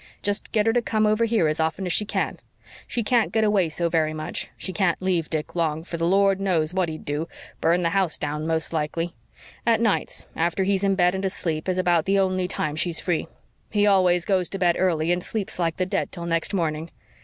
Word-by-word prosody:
Just 205 0 0
get 210 -2 +2
her 225 - +3
to 245 - +2
come 215 -2 +1
over 215 +2 +3
here 220 -8 +2
as 155 +1 -1
often 160 +4 -1
as 180 - +1
she 210 - +2
can. - - -2 0.5
She 235 - -1
can't 235 +1 +2
get 220 - +2
away 205 -5 +2
so 170 +2 0
very 160 -2 +1
much 155 0 -4
she 185 - -5
can't 185 -4 +1
leave 180 -4 0
Dick 155 -1 -3
long, 160 -2 -1
for 170 0 -6
the 165 0 0
Lord 195 +1 +3
knows 170 -4 +1
what 185 -2 +1
he'd 155 0 -7
do 150 +3 -2 0.3
burn 170 +2 +2
the 170 - +2
house 190 -3 +1
down 150 +1 -3
most 160 0 -1
likely. 165 +2 -2 0.5
At 230 -2 +3
nights, 225 -3 0
after 170 +3 0
he's 195 0 +1
in 195 -1 +2
bed 180 -1 +3
and 190 0 -3
asleep, 165 -3 -1
is 185 - 0
about 175 -3 +2
the 195 +1 +2
only 185 -1 +1
time 155 -4 -2
she's 165 +1 -1
free. 175 -3 -1 0.4
He 205 -1 +2
always 185 -3 +4
goes 185 -3 +1
to 195 - -4
bed 175 -2 +3
early 170 -3 +1
and 175 0 0
sleeps 210 -4 -2
like 165 -2 0
the 185 - 0
dead 185 - -2
till 170 -2 -6
next 165 -1 0
morning. 165 -4 -1
180 Hz, 230 wpm, -24 LUFS, 165-195 Hz, 0.5 s, always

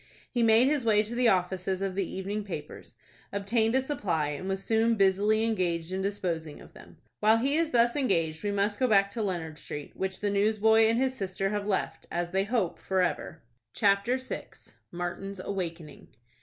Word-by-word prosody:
He 240 - 0
made 225 +1 +5
his 290 -2 +1
way 215 -2 +4
to 220 +2 -7
the 245 0 +2
offices 185 -1 +1
of 195 -1 -2
the 190 -1 -2
evening 200 +3 -3
papers, 155 -7 -8 0.4
obtained 220 +4 +1
a 265 - +2
supply, 175 - -1
and 150 +6 -5
was 195 0 -2
soon 225 +1 +2
busily 205 +2 +3
engaged 180 -6 -1
in 190 +1 -2
disposing 175 -6 -3
of - - -15
them. - - -15 0.2
While 215 +1 +5
he 270 +5 +1
is 330 0 +2
thus 235 -3 +3
engaged, 165 - 0
we 205 - 0
must 205 +1 0
go 255 - +3
back 200 -3 +4
to 225 - -4
Leonard 165 -6 -3
Street, 145 -1 -8
which 190 0 -3
the 205 -1 -1
newsboy 220 +2 +4
and 225 +1 +2
his 260 +1 +1
sister 195 -2 -2
have 205 0 -2
left, 195 -3 -2
as 175 0 -2
they 190 +1 +1
hope, 210 -6 -1
forever. 180 -3 -1 0.3
CHAPTER 200 +4 +2
VI. 260 0 -6 0.4
MARTIN'S 180 +3 -5
AWAKENING. 170 -5 -5
200 Hz, 185 wpm, -28 LUFS, 185-225 Hz, 0.4 s, made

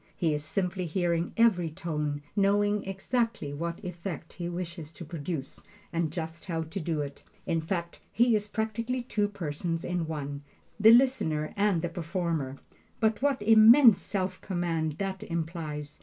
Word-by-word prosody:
He 165 -3 +1
is 150 0 -2
simply 180 +2 -2
hearing 170 0 0
every 195 -8 +4
tone, 150 -3 -3
knowing 205 0 +2
exactly 225 - -1
what 170 +5 -4
effect 175 -2 -6
he 175 -1 -4
wishes 170 -3 -5
to 170 - -9
produce 150 -3 -5 0.3
and 165 -2 0
just 165 0 -5
how 165 -2 -1
to 160 +5 -5
do 160 -2 -1
it. 140 -1 -6 0.2
In 165 -1 0
fact, 170 +1 -3
he 235 0 +4
is 210 0 -1
practically 225 +4 -2
two 210 -4 0
persons 165 -3 -3
in 175 -2 -1
one 145 -2 -4 0.4
the 215 +2 +8
listener 225 - +4
and 200 -5 +2
the 175 - 0
performer. 165 -5 -2 0.4
But 220 0 +2
what 275 -6 +1
immense 225 +2 +8
self 190 -2 -3
command 170 -4 -1
that 190 +3 -4
implies! 160 -3 -4
175 Hz, 155 wpm, -29 LUFS, 160-205 Hz, 0.4 s, the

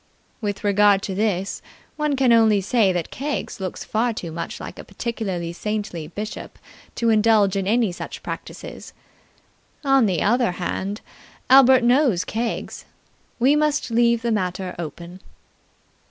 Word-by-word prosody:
With 205 -1 -3
regard 205 -1 +4
to 195 - -3
this, 195 -1 -1 0.3
one 300 -2 0
can 260 -3 +4
only 220 -3 +5
say 200 0 +2
that 175 -3 -3
Keggs 290 -4 -4
looks 185 -2 -5
far 230 +2 0
too 175 -6 -6
much 170 +1 -5
like - - -8
a - - -7
particularly 190 -8 -4
saintly 200 -5 -4
bishop 210 +6 -7 0.4
to 230 -1 +1
indulge 215 -3 +4
in 195 -1 -1
any 225 -1 +2
such 175 - -8
practices. - - -8 0.9
On 270 -4 +4
the 180 -5 0
other 235 -2 +2
hand, 190 +3 -4 0.5
Albert 260 -1 +7
knows 240 - +3
Keggs. 230 +1 -4 0.5
We 265 +4 +4
must 300 -4 0
leave 235 0 +3
the 235 - 0
matter 185 -3 -2
open. 170 +2 -7
215 Hz, 140 wpm, -22 LUFS, 190-240 Hz, 0.9 s, Albert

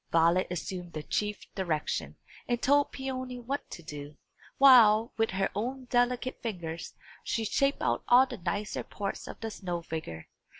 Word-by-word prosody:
Violet 170 +2 +4
assumed 180 0 -5
the 155 - -5
chief 210 +4 -2
direction, 170 -6 -2 0.3
and 240 -1 0
told 285 +3 +3
Peony 255 -1 -4
what 260 +4 -4
to 170 - -9
do, 145 -1 -8 0.4
while, 230 -4 +7
with 225 0 +1
her 195 +1 0
own 255 +5 -3
delicate 245 +1 +1
fingers, 170 -8 -5 0.3
she 225 - -1
shaped 275 +6 +1
out - - +1
all 250 +2 +7
the 250 -4 -8
nicer 205 +4 -2
parts 200 -2 -5
of - - -8
the 225 -1 -3
snow 175 -4 -4
figure. 155 - -6
210 Hz, 160 wpm, -30 LUFS, 175-250 Hz, 0.4 s, while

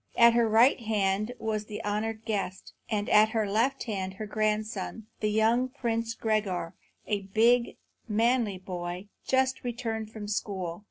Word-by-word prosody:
At 235 0 +7
her 235 -1 +3
right 235 +6 +5
hand 215 0 0
was 215 -1 -2
the 210 +1 -6
honoured 215 +2 -2
guest, 195 -4 -3 0.2
and 210 -2 -1
at 215 +1 +6
her 220 -1 0
left 235 +7 +1
hand 190 -4 -3
her 215 - -5
grandson, 215 0 -2
the 215 - 0
young 225 +4 +2
Prince 230 -3 -2
Gregor, 195 -6 -1 0.3
a 200 -2 -2
big, 235 +2 +4 0.3
manly 225 -1 +2
boy, 180 +1 -6 0.2
just 260 0 +1
returned 225 -3 -3
from 215 -2 -7
school. 190 -5 -3
215 Hz, 150 wpm, -28 LUFS, 205-230 Hz, 0.3 s, At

